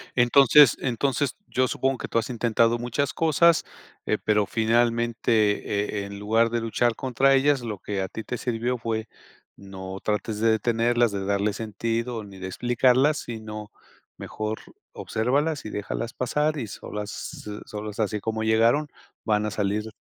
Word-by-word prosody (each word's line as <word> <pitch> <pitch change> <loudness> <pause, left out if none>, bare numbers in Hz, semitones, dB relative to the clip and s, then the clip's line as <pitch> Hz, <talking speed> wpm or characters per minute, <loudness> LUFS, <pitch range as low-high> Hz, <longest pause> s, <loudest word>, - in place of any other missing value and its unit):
Entonces, 135 +2 +6
entonces 135 +2 -1
yo 130 0 +1
supongo 135 +2 0
que - - -5
tú - - -2
has 115 - -4
intentado 115 -1 +2
muchas 125 +4 -1
cosas, 165 +1 +3 0.4
eh, - - +1
pero 105 -1 +2
finalmente 115 -2 +1
eh, - - -6
en 100 0 -8
lugar 115 +3 +2
de 115 0 -1
luchar 115 +1 +1
contra 135 +1 +2
ellas, 135 0 +3
lo 110 -4 -5
que 100 0 -3
a 95 - -2
ti 110 - -7
te 125 - -4
sirvió 120 +1 -2
fue: 110 -1 -3 0.5
"No 95 -1 -8
trates 105 0 -2
de 115 0 +3
detenerlas, 120 +1 +2
de 100 -1 -3
darles 100 +1 0
sentido, 115 +1 -3
ni 100 -2 -12
de 95 - -5
explicarlas", 125 +8 +2
sino 110 -2 -7 0.5
mejor 110 0 -4 0.3
obsérvalas 140 +7 -1
y - - -4
déjalas 105 +3 -4
pasar 150 +5 0
y 125 - -3
solas, 105 +1 -6 0.3
s 105 - -6
solas 105 0 -7
así 105 0 0
como 110 +1 -3
llegaron, 115 +7 +3 0.4
van 105 -1 +1
a 105 - -2
salir. 105 +1 -1
115 Hz, 160 wpm, -25 LUFS, 105-125 Hz, 0.5 s, Entonces